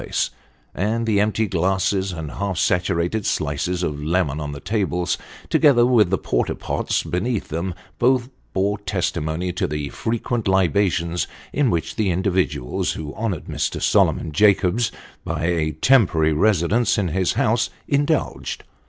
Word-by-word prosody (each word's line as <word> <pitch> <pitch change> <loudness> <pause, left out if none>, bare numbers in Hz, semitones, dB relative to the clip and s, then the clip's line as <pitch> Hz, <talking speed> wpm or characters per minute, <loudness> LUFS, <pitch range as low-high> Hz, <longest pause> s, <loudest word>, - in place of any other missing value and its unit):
place; - - -1 0.4
and 110 +5 -1
the 110 -3 +2
empty 110 +1 +1
glasses 95 +1 0
and 80 -4 -6
half 100 -2 -3
saturated 90 +4 +1
slices 80 +5 -1
of 75 -3 -3
lemon 80 -3 0
on 75 -1 -4
the 70 - -7
tables, 90 -2 -1 0.3
together 120 -5 +5
with 115 -7 +4
the 95 - +1
porter - - -1
pots - - -1
beneath 105 +5 -2
them, 85 +3 -3 0.2
bore 120 -5 0
testimony 90 -3 -2
to 90 - -1
the 75 -1 -3
frequent 115 - -2
libations 90 -2 +1 0.3
in 145 -3 +2
which 85 -6 -2
the 105 -3 +1
individuals 90 -7 0
who 75 -2 -6
honoured 105 -7 -3
Mr. - - -2
Solomon 80 - +2
Jacobs 100 +5 +3 0.3
by 80 -2 -2
a 80 -3 0
temporary 80 - +3
residence 105 +6 +2
in 95 -4 0
his 95 +3 +1
house 115 +2 +1 0.2
indulged. 145 +2 -1
95 Hz, 140 wpm, -22 LUFS, 85-110 Hz, 0.4 s, together